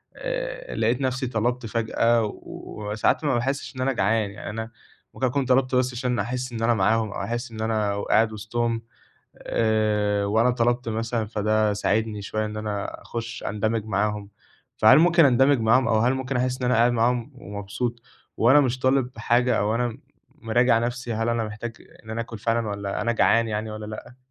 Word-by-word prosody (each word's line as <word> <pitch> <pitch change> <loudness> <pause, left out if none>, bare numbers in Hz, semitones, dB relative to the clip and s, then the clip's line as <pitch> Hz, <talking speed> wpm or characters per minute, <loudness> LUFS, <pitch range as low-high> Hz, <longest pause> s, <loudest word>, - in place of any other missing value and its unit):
آآ، - - -4
لقيت 120 +3 +1
نفسي 130 0 -1
طَلَبت 120 +1 -1
فجأة 115 +1 +1 0.2
وساعات 105 +6 -2
ما 145 - +1
باحسّش 135 +4 -2
إن 130 - -4
أنا 135 +1 +1
جعان، 110 -1 +1
يعني 100 - -8
أنا 110 +2 -5 0.4
ممكن 130 - -1
أكون 135 +2 0
طَلَبت 130 0 +2
بس 125 0 +1
عشان 125 -1 -1
أحس 125 +4 -3
إن 115 -1 -5
أنا 120 +1 +4
معاهم 110 +1 +1
أو - - -5
أحس 120 +1 -4
إن 110 -1 -7
أنا 105 -2 0
قاعد 110 +1 +2
وسطهم 115 +2 -2 0.6
آآ، 105 -2 +1
وأنا 110 +4 +3
طَلَبت 120 0 0
مثلًا 115 0 -2
فده 110 0 +1
ساعدني 105 +1 -1
شوية 110 +2 -2
إن 105 0 -5
أنا 105 -2 -4
أخش 115 0 -6
أندمج 110 +1 -1
معاهم، 105 0 -1 0.5
فهل 120 +6 +7
ممكن 170 -1 +5
أندمج 135 +1 +4
معاهم 115 +4 +3
أو 110 - +3
هل 120 +4 +3
ممكن 130 0 -2
أحس 125 0 0
إن - - 0
أنا 125 - +2
قاعد 120 +2 +4
معاهم 120 +2 0
ومبسوط 105 +2 -5 0.4
وأنا 130 +6 +6
مش 130 -3 +1
طالب 130 -2 +1
حاجة، 120 +2 +2
أو 105 +2 +1
أنا 120 +1 +1
م 115 - -7 0.5
مراجع 120 +1 +4
نفسي 120 0 -3
هل 115 +1 -1
أنا 115 -1 0
محتاج 110 +2 -7 0.3
إن - - -12
أنا 110 +1 -2
آكل 115 -1 -7
فعلًا 115 +1 0
والَّا 100 -1 -3
أنا 120 +2 +1
جعان 115 0 +3
يعني 110 0 -3
والَّا 110 0 -6
لأ؟ 110 +3 -9
115 Hz, 185 wpm, -24 LUFS, 110-125 Hz, 0.6 s, فهل